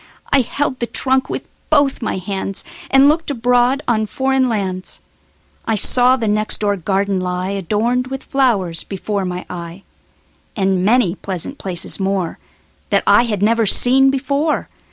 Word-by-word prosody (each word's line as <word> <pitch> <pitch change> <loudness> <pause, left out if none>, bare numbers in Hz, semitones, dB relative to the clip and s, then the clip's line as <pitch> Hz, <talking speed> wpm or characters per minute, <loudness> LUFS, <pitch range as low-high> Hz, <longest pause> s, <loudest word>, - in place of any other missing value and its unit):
I 275 - +5
held 260 +1 -3
the 235 - -2
trunk 260 +1 +1
with - - -5 0.2
both 285 -4 +2
my 215 - -2
handsAnd 195 +8 0
looked 315 +2 +1
abroad 250 +1 +1
on 220 -2 +1
foreign 265 +2 0
lands.I 195 +2 -6
saw 250 +4 +4
the 230 -4 -3
next 215 +1 +1
door 205 -1 +1
garden 195 +1 -1
lie, 180 +1 -3
Adorned 215 +7 -1
with 270 0 -6
flowers, 205 - 0
before 200 0 -4
my 180 0 -5
eye, 175 +2 -8 0.7
And 190 -2 0
many 215 -3 +3
pleasant 190 - -6
places 180 0 -1
moreThat 190 -3 -3
I 240 - +5
had 210 -4 -2
never 225 0 +2
seen 265 +6 +5
before. 280 +3 -1
215 Hz, 140 wpm, -18 LUFS, 190-260 Hz, 0.7 s, I